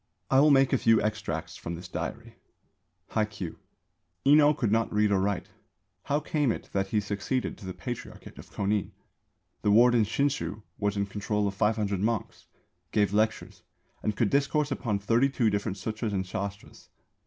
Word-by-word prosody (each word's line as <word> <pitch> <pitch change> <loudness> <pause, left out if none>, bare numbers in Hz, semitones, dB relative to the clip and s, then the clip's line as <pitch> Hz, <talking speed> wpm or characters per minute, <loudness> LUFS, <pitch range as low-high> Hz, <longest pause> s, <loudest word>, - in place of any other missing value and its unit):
I 135 - +6
will 150 +2 +6
make 135 -1 +5
a 135 - +3
few 115 -1 +4
extracts 110 +1 -3
from 85 - -5
this 90 +2 -9
diary: 80 -5 -5 0.8
Hai 110 - +1
Kyū. 100 -6 -7 0.7
Enō 150 +1 +6
could 110 -5 0
not 115 +1 +1
read 105 0 +2
or 100 - +3
write. 100 -1 -1 0.6
How 145 +1 +1
came 150 -3 0
it - - -6
that 95 0 0
he 105 +2 +1
succeeded 105 +5 -2
to 100 - -9
the 95 - -4
Patriarchate 120 +6 -7
of - - -12
Kōnin? 100 0 -1 0.7
The - - +1
warden 120 +2 +6
Shinshū 130 -2 -1 0.2
was 105 0 0
in 100 - +1
control 105 +1 -1
of 100 - -2
500 105 -1 0
monks, 110 +1 -2 0.4
gave 105 -2 +2
lectures, 110 +1 0 0.4
and 105 - -1
could 115 - +2
discourse 145 +1 +1
upon 115 -6 -1
thirty 115 +7 +2
two 120 -5 +1
different 100 -1 -2
Sūtras 110 +2 -3
and 95 -1 0
Shāstras. 100 +2 -6
105 Hz, 170 wpm, -28 LUFS, 100-120 Hz, 0.8 s, I